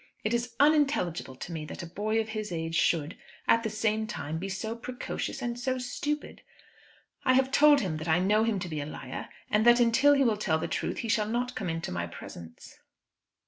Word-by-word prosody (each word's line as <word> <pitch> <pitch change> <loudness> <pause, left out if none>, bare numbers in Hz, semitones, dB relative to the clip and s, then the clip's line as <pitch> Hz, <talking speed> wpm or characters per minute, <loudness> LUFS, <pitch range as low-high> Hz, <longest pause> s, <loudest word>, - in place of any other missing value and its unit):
It 215 - 0
is 235 0 -1
unintelligible 280 - +2
to 175 - -8
me 160 -2 -4
that 150 - -7
a - - -5
boy 210 +6 -1
of 220 0 -2
his 215 -2 -4
age 165 -1 -3
should, 165 -1 +1 0.3
at 230 - +5
the 225 - -2
same 215 0 0
time, 160 -8 -4
be 195 +3 -4
so 220 +4 -3
precocious 250 +2 -5
and 240 0 -3
so 255 +1 -1
stupid. 290 +4 -4 0.8
I 255 - +4
have 265 +1 +3
told 290 0 +6
him 175 -7 -2
that 155 +2 -6
I 160 0 +4
know 205 +4 +3
him 225 -2 +1
to - - -3
be 155 -3 -3
a - - -4
liar, 130 -4 -7 0.2
and 210 +1 +3
that 240 0 +7
until 245 +5 +5
he 275 -1 +4
will 225 -4 +2
tell 160 -6 +1
the 160 - -3
truth - - -2
he - - -2
shall 210 -1 +1
not 245 +2 -1
come 195 -4 -3
into 165 0 -3
my 85 0 -2
presence." 85 -1 -11
215 Hz, 220 wpm, -29 LUFS, 165-240 Hz, 0.8 s, that